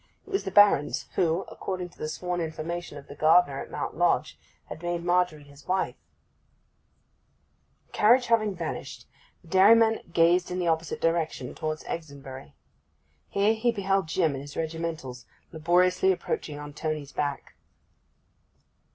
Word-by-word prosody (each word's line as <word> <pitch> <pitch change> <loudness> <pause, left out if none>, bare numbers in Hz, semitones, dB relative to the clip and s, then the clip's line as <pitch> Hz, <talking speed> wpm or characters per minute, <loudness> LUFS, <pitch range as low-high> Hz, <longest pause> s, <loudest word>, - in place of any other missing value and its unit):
It 400 - -14
was 390 - 0
the - - -1
Baron's 195 -7 +4
who, 170 +1 +1
according 185 -2 -5
to - - -24
the 155 - -3
sworn 180 +2 -3
information 165 0 -5
of 140 - -11
the - - -9
gardener 155 -2 +4
at - - -9
Mount - - -4
Lodge, - - +1 0.3
had 160 - -9
made 175 0 -2
Margery 175 -4 +1
his 140 0 -17
wife. 185 +1 0 1.9
The - - -35
carriage 245 +4 +5
having 215 -4 +2
vanished, 165 -3 -6 0.4
the - - -18
dairyman 220 +4 +5
gazed 170 +2 +3
in 180 - -3
the 180 -1 -1
opposite 160 0 -1
direction, 165 -6 -1
towards 155 -1 -4
Exonbury. 140 -4 -8 0.8
Here 205 +2 +2
he 230 +2 +1
beheld 195 -4 0
Jim 160 -2 +1
in 135 - -5
his 145 +1 -10
regimentals, 160 -6 -4 0.2
laboriously 180 +3 +3
approaching 155 -4 -3
on 145 0 -8
Tony's 155 -2 -4
back. 145 -1 -3
170 Hz, 145 wpm, -27 LUFS, 155-185 Hz, 1.9 s, carriage